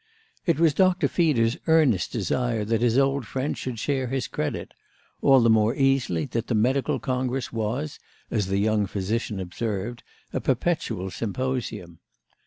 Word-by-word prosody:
It 165 -3 +2
was 165 -3 +4
Dr. 185 +2 +3
Feeder's 130 -9 +2
earnest 155 - +3
desire 115 0 -1
that 115 +1 0
his 120 0 +3
old 135 -3 +2
friend 135 +5 -2
should 125 -3 -5
share 130 +2 -1
his 130 +1 -2
credit—all 135 -2 -1
the 115 - +4
more 110 +1 +3
easily 135 - +1
that 115 0 -3
the 120 - 0
medical 130 +5 +1
congress 130 -2 -2
was, 120 +7 -3 0.3
as 105 -5 0
the 95 +1 0
young 105 0 +2
physician 105 +2 -2
observed, 105 +4 -4 0.3
a - - -1
perpetual 120 - -1
symposium. 115 -5 -3
120 Hz, 145 wpm, -25 LUFS, 105-135 Hz, 0.3 s, was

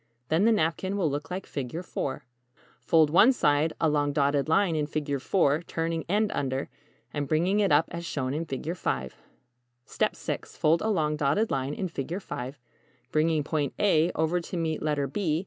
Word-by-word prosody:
Then 165 +6 +3
the 230 - +5
napkin 190 0 0
will 165 -7 +1
look 145 +1 -4
like 185 +1 -4
=Figure 140 +4 -4
IV= - - -14
5. 135 - -2 0.6
Fold 160 -3 +4
one 215 +10 +7
side 150 - +2
along 145 -2 +1
dotted 140 0 +1
line 175 0 +3
in 150 -1 0
=Figure 145 -2 -2
IV=, 155 +2 +1
turning 165 0 -2
end 210 +2 +2
under, 135 0 -2 0.4
and 145 -1 -2
bringing 175 +8 +2
it 200 -2 +2
up 150 +2 +5
as 170 0 -5
shown 135 -5 -2
in 160 +3 -2
=Figure 150 +3 -4
V= 65 - -2 0.8
6. - - -3
Fold 160 +2 +3
along 155 -9 0
dotted 150 +10 +1
line 135 +1 -1
in 190 - -2
=Figure 165 +2 -4
V=, 130 -8 -6 0.6
bringing 155 0 +2
point 150 -2 -2
"a" 170 -5 +3
over 160 +3 +1
to 175 - -6
meet 160 -2 -1
letter 150 -2 0
"b". 155 +2 -1
155 Hz, 180 wpm, -27 LUFS, 145-175 Hz, 0.8 s, one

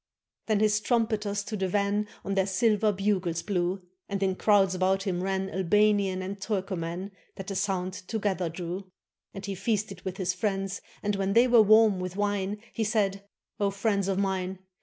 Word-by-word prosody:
Then 215 -2 +2
his 210 0 +3
trumpeters 215 -3 0
to 215 - -5
the 190 -2 -1
van 205 +2 0 0.2
On 200 - -1
their 190 -1 +2
silver 215 +1 +2
bugles 190 -4 0
blew, 185 -1 -1 0.3
And 200 -1 -1
in 190 -1 +1
crowds 195 -2 +4
about 190 +1 +1
him 180 -3 -1
ran 190 0 -1
Albanian 195 0 +2
and 195 +1 -6
Turkoman, 190 -2 -3 0.2
That 195 - -7
the 195 - -5
sound 185 -1 -1
together 190 -3 -2
drew. 180 +3 -6 0.4
And 195 -1 -6
he 200 - -3
feasted 195 -1 -2
with 190 0 -5
his 180 -2 0
friends, 195 0 -2 0.2
And 205 -1 0
when 195 0 0
they 235 +3 +6
were 240 -2 +7
warm 215 -2 +5
with 185 0 -4
wine. 205 0 -1 0.2
He 225 - -1
said: 200 -2 0 0.3
"O 200 -1 +2
friends 200 -1 0
of 195 -1 0
mine. 190 -1 -1
195 Hz, 180 wpm, -28 LUFS, 185-210 Hz, 0.4 s, were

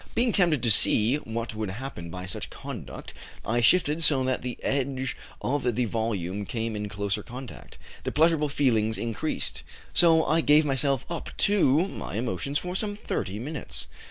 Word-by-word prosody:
Being 240 0 +3
tempted 170 - +3
to 115 - +4
see 110 +4 +4
what 115 -4 -4
would 110 -2 -3
happen 95 -5 -6
by 90 +2 -6
such 95 - -6
conduct, - - -8 0.3
I 120 +3 +1
shifted 160 +4 +3
so 140 -4 +4
that 130 0 0
the 125 -2 -4
edge 130 -1 -1 0.3
of 125 -3 0
the 125 +1 +1
volume 105 -4 -2
came 115 +1 -3
in 105 0 -3
closer 100 +1 -2
contact. 125 +3 -10 0.3
The - - -2
pleasurable 155 -1 +3
feelings 115 -6 +2
increased, 115 -2 -2 0.3
so 165 -2 +5
I 160 +2 +3
gave 150 0 +5
myself 135 -1 +1
up 170 - -5 0.2
to 180 -4 +4
my - - -6
emotions 120 +5 -1
for 180 +3 -4
some 205 +1 -1
thirty 100 - -3
minutes. 115 - -6
130 Hz, 165 wpm, -27 LUFS, 110-150 Hz, 0.3 s, so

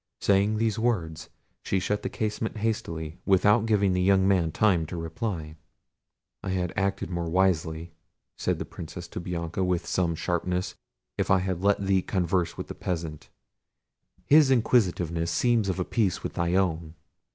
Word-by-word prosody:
Saying 100 +2 +2
these 110 0 0
words 85 -9 -1 0.3
she 95 - 0
shut 105 +3 -1
the - - -3
casement 110 +1 -3
hastily, 85 -8 -3
without 105 +3 +4
giving 100 -3 +3
the 90 - +1
young 95 0 +4
man 90 -5 +2
time 90 -6 +2
to 90 - -6
reply. 80 -1 -4 0.8
"I 100 - -5
had 90 -2 -1
acted 100 -2 -1
more 85 -1 -2
wisely," 85 -2 0 0.4
said - - -1
the - - -4
Princess 85 +1 -8
to - - -6
Bianca, 85 0 -3
with 90 -2 0
some 85 -3 0
sharpness, 90 +2 -2 0.5
"if - - 0
I 95 - +6
had 90 -1 -2
let 100 0 +2
thee 95 -1 +3
converse 90 -2 -1
with - - -4
this - - -8
peasant; 80 -4 -4 1.0
his 150 +2 +6
inquisitiveness 90 -9 +2
seems 115 -5 +2
of 95 - -1
a 90 - 0
piece 105 -7 0
with - - -4
thy 85 +1 0
own." 85 -4 0
90 Hz, 165 wpm, -27 LUFS, 85-100 Hz, 1.0 s, I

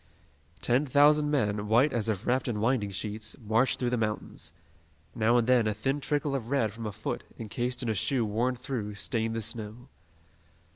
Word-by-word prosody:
Ten 125 +8 +2
thousand 150 +2 +5
men, 105 -7 0
white 120 +7 +4
as 115 -2 0
if 105 0 -2
wrapped 125 +1 +1
in 110 -4 -1
winding 110 -2 +1
sheets, 105 +2 -4
marched 115 +3 +1
through 125 -1 -1
the 125 - +1
mountains. 105 -6 -3 0.6
Now 115 +1 +3
and 120 - +3
then, 125 -3 +4
a 105 - 0
thin 135 +7 -1
trickle 145 0 0
of 120 -4 -3
red 120 -7 +1
from 115 0 -5
a - - -3
foot, - - -4
encased 120 +3 -3
in 120 - -1
a - - +2
shoe 120 +4 +1
worn 115 +5 0
through, 120 -5 -4
stained 115 +1 -1
the 115 - -2
snow. 115 +4 -5
115 Hz, 190 wpm, -29 LUFS, 105-130 Hz, 0.6 s, thousand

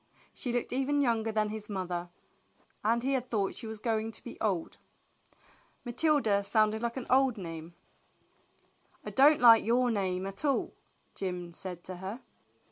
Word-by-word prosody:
She 245 - -4
looked 245 0 -2
even 270 +3 +1
younger 230 -4 +1
than 215 -1 0
his 215 0 -6
mother, 180 -3 -3 0.7
and 230 +3 +2
he 270 +1 +1
had 255 -1 -1
thought 200 -4 0
she 225 - -7
was 220 0 -6
going 220 0 -1
to - - -7
be 240 - -8
old. 190 -7 -1 1.1
Matilda 240 -5 +2
sounded 215 +1 +2
like 235 +1 -2
an 260 - -4
old 260 -2 +3
name. 165 -2 -7 1.3
I - - -5
don't 285 +3 +6
like 230 -2 +8
your 245 +2 +2
name 190 -3 -1
at 195 +5 -5
all," 280 -3 0 0.4
Jim 180 -3 -4
said 175 0 -6
to 185 -1 -7
her. 190 +6 -6
220 Hz, 160 wpm, -30 LUFS, 190-245 Hz, 1.3 s, like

